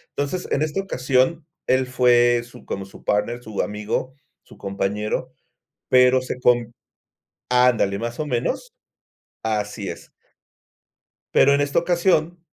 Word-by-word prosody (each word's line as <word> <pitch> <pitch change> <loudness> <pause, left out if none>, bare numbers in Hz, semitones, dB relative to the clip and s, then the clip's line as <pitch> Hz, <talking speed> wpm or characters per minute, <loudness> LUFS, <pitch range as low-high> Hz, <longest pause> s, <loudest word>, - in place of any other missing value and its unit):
Entonces, 145 +6 -2
en 140 - 0
esta 155 +4 -1
ocasión, 135 -2 0 0.2
él 130 0 +2
fue 120 -1 +4
su, 120 - -15
como 95 - -4
su 95 - -15
partner, 120 +4 -1
su 110 -2 -3
amigo, 105 +5 -3 0.3
su - - -17
compañero, 100 +2 -3 0.5
pero 125 0 +5
se 125 0 -5
con 120 -2 +2 0.8
ándale, 125 -6 +3
más 120 +1 -4
o 155 - -2
menos, 145 - -2 0.7
así 105 -2 -2
es. - - -9 1.3
Pero 140 +1 +6
en 140 - +2
esta 145 +3 +2
ocasión, 175 -1 +1
125 Hz, 130 wpm, -22 LUFS, 110-145 Hz, 1.3 s, Pero